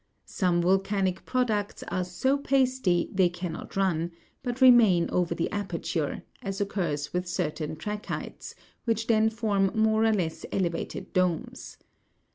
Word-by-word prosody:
Some 175 -2 +1
volcanic 190 0 +1
products 220 -5 -1
are 185 - -1
so 180 +10 0
pasty 260 -10 +1
they 185 -2 +4
cannot 175 -2 -6
run, 175 -4 +1 0.3
but 245 0 -4
remain 230 -10 +6
over 175 -2 +1
the 170 - 0
aperture, 170 -6 -3 0.2
as 195 0 -4
occurs 175 -8 -2
with 180 0 -1
certain 155 -3 -2
trachytes, 210 +6 -6 0.3
which 225 -1 0
then 220 -1 +3
form 210 -4 +1
more 220 0 +3
or 225 - +4
less 170 -6 -2
elevated 175 -3 -3
domes. 180 -3 -1
190 Hz, 130 wpm, -27 LUFS, 175-220 Hz, 0.3 s, remain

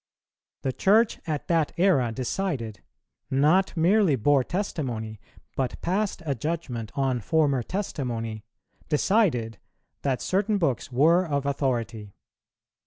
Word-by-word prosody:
The 130 - -1
Church 215 - +3
at 150 -2 -3
that 165 -3 +1
era 155 -10 +3
decided 125 - -3 0.5
not 155 +8 +3
merely 180 -1 +4
bore 135 +3 +3
testimony, 125 - -3 0.4
but 130 -2 -2
passed 190 0 -1
a 145 - 0
judgment 125 -5 -4
on 135 -3 0
former 140 +2 +2
testimony, 120 - -4 0.5
decided, 150 - +1 0.4
that 135 -3 0
certain 205 +3 0
books 140 - -1
were 160 +8 +4
of 140 -5 -2
authority. 115 -7 -2
140 Hz, 110 wpm, -26 LUFS, 120-175 Hz, 0.5 s, merely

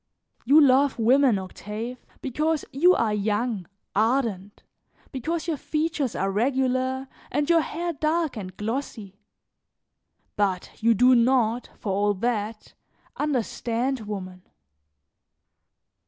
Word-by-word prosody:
"You 285 +6 +7
love 275 -1 +4
women, 250 0 +4
Octave, 210 +6 -6 0.2
because 300 +3 -1
you 350 +7 +5
are 220 -2 +1
young, 210 -1 -1 0.3
ardent, 215 -3 0 0.5
because 320 +6 -3
your 320 -3 -1
features 305 -3 -2
are 195 +1 0
regular 260 +3 0 0.2
and 295 -1 0
your 335 -1 +5
hair 340 +2 -3
dark 315 +1 0
and 185 -4 -7
glossy, 220 -3 -5 1.2
but 195 -3 -1
you 230 +1 +4
do 250 +4 +5
not, 240 -1 +2
for 205 - -4
all 205 +1 +1
that, 215 0 -3 0.4
understand 255 -2 -1
woman. 185 -3 -6
245 Hz, 110 wpm, -25 LUFS, 210-280 Hz, 1.2 s, You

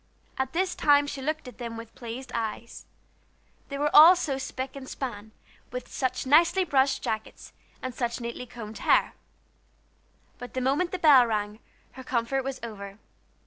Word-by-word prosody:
At 265 0 -1
this 365 +2 0
time 290 -1 +4
she 285 -1 -6
looked 310 +1 -3
at 250 - -11
them 230 -1 -5
with 230 0 -10
pleased 245 +2 -8
eyes, 230 0 -5 0.8
they 280 - -4
were 295 +1 0
all 325 +5 +10
so 280 -6 -2
spick 265 0 -5
and 265 -1 -8
span, 220 -5 -6 0.4
with 250 +1 -7
such 255 -1 -2
nicely 335 +7 +4
brushed 275 -5 +1
jackets 220 0 -5 0.3
and 255 -1 -4
such 235 0 -2
neatly 235 +1 -6
combed 220 -2 -9
hair. - - +3 1.3
But 245 +1 -9
the - - 0
moment 280 +8 +1
the 370 - -2
bell 285 -8 +6
rang 210 -1 -2 0.3
her 260 - -11
comfort 255 +2 -1
was 270 0 -4
over. 200 -3 -8
260 Hz, 165 wpm, -27 LUFS, 235-285 Hz, 1.3 s, all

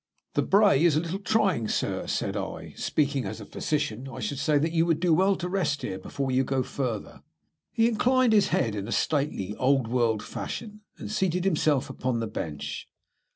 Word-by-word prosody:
"The - - +2
brae 200 -7 +4
is 170 -4 +4
a - - +4
little 170 +4 -3
trying, 195 - +1
sir," - - -1
said - - -1
I. - - -5
"Speaking 140 -3 0
as 105 +3 -5
a 105 - -8
physician, 135 -3 -2
I 130 - -7
should 130 +4 -3
say 150 +1 +2
that 160 +3 +1
you 165 -1 +3
would 165 -2 +2
do 175 -1 +3
well 190 +4 +4
to 180 - -4
rest 180 -6 -1
here 95 - -3
before 135 +7 -3
you 130 +1 +3
go 130 0 0
further." 125 -5 -4 0.5
He 225 0 +3
inclined 245 +1 +3
his 210 -2 +5
head 115 -5 +1
in 100 -1 -4
a - - -5
stately, 135 -9 0
old 135 -2 +2
world 115 -3 +1
fashion, 210 -2 -6 0.2
and - - -7
seated 185 -3 0
himself 155 -6 +2
upon 125 -2 -2
the 115 - -1
bench. 80 -9 -5
145 Hz, 200 wpm, -27 LUFS, 125-185 Hz, 0.5 s, his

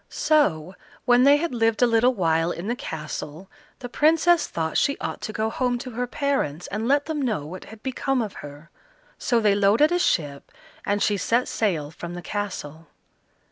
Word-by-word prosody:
So, 185 - +1 0.3
when 245 0 +5
they 285 +1 +7
had 335 -1 -2
lived 225 0 +1
a - - +8
little 240 +2 +3
while 165 -3 +1
in 175 +3 -6
the 240 - -1
castle, 160 -1 -7 0.3
the 245 - -7
Princess 325 +6 +3
thought 160 -1 -3
she 280 - +2
ought - - -5
to - - -4
go 220 +1 -2
home 250 0 0
to 255 +1 -7
her 245 +2 -3
parents, 245 - -2
and 220 +3 -3
let 285 +2 +2
them 310 -2 -3
know 215 - -1
what 180 +4 -9
had 220 -1 -13
become 265 0 -1
of 215 -4 -3
her; 145 +3 -12 0.5
so 240 - +1
they 210 -2 +3
loaded 205 +10 +3
a 355 - +2
ship, 145 - -1 0.4
and 205 0 +1
she 205 - +1
set 235 +5 +1
sail 165 -9 -1
from 170 +1 -8
the 175 - -8
castle. 165 -7 -5
220 Hz, 190 wpm, -24 LUFS, 170-255 Hz, 0.5 s, a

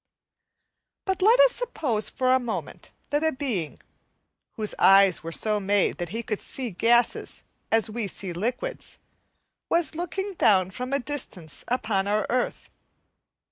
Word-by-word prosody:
But 380 -1 -1
let 450 +6 +5
us - - +6
suppose 270 - -2
for 255 0 +1
a 260 - +4
moment 240 -3 -6 0.2
that 290 +2 +1
a 320 - +2
being, 240 - -3 0.7
whose 215 -2 -3
eyes 195 -1 +6
were 165 - -6
so 210 +4 +2
made 200 -1 +1
that 175 -1 -3
he 225 +5 -4
could 215 -3 -3
see 255 -4 -3
gases 235 +5 +1 0.3
as 225 0 +3
we 220 -1 -3
see 190 -2 -3
liquids, 245 - -4 0.7
was 335 -4 +2
looking 385 +4 -4
down 190 - +3
from 250 +6 -5
a 280 - +2
distance 230 - -4
upon 215 -5 0
our 210 +1 +1
earth. 250 0 -2
230 Hz, 145 wpm, -25 LUFS, 200-285 Hz, 0.7 s, us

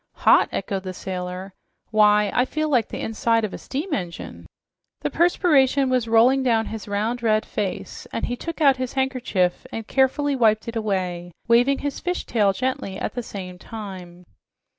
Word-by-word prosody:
"Hot!" - - +6
echoed 195 0 -3
the 185 -1 -6
sailor. 185 +1 -5 0.4
"Why, 210 -1 +4
I 250 - +3
feel 310 +4 -2
like 245 -6 +2
the - - -6
inside 225 +1 +1
of 205 - -6
a - - -6
steam 305 +6 -4
engine!" 175 -8 -5 0.5
The - - -2
perspiration 285 -6 +3
was 250 -3 +1
rolling 235 +4 +5
down 230 -4 +2
his 220 -1 -7
round, 215 +4 -1
red 215 -2 +2
face, 200 -3 -4
and - - -2
he 245 - -3
took 335 +5 -6
out 275 -3 +5
his 255 -1 -4
handkerchief 255 -9 0
and 225 -1 -5
carefully 275 +3 +1
wiped 220 -3 +2
it 230 - -5
away, 180 -5 -2
waving 245 +4 +4
his 285 - -2
fish 360 0 -3
tail 210 -4 +2
gently 225 -4 -3
at - - -3
the 245 - -3
same 185 -5 -8
time. 185 -6 -9
225 Hz, 175 wpm, -23 LUFS, 195-260 Hz, 0.5 s, Hot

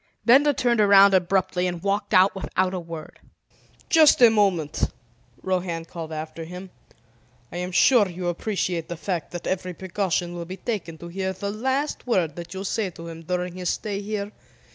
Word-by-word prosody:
Benda 275 +5 +6
turned 240 -4 +1
around 200 -1 +7
abruptly 185 0 +1
and 175 -1 -5
walked 200 +1 -1
out 190 -1 +5
without 185 -1 -1
a 185 - -2
word. 165 -2 -9 0.7
"Just 315 -3 +6
a 240 -2 +8
moment," 190 -8 +1 0.5
Rohan 180 -3 -2
called 165 -1 -8
after 155 +1 -6
him. 180 +3 -9 0.8
"I 175 - -6
am 180 +1 -3
sure 215 +3 +5
you 180 0 -5
appreciate 175 -2 -2
the 175 - -5
fact 175 -2 -3
that 175 - -7
every 185 -1 -2
precaution 180 -2 -2
will 170 -1 -5
be 185 +3 -7
taken 185 -6 -4
to 170 - -9
hear 190 +1 -3
the 200 +2 -4
least 265 +7 -2
word 175 -10 +1
that 170 0 -8
you 190 - -4
say 200 0 -1
to 170 -1 -10
him 165 0 -9
during 180 +1 -3
his 180 -1 -2
stay 205 -2 -3
here? 205 0 -4
185 Hz, 180 wpm, -24 LUFS, 170-200 Hz, 0.8 s, a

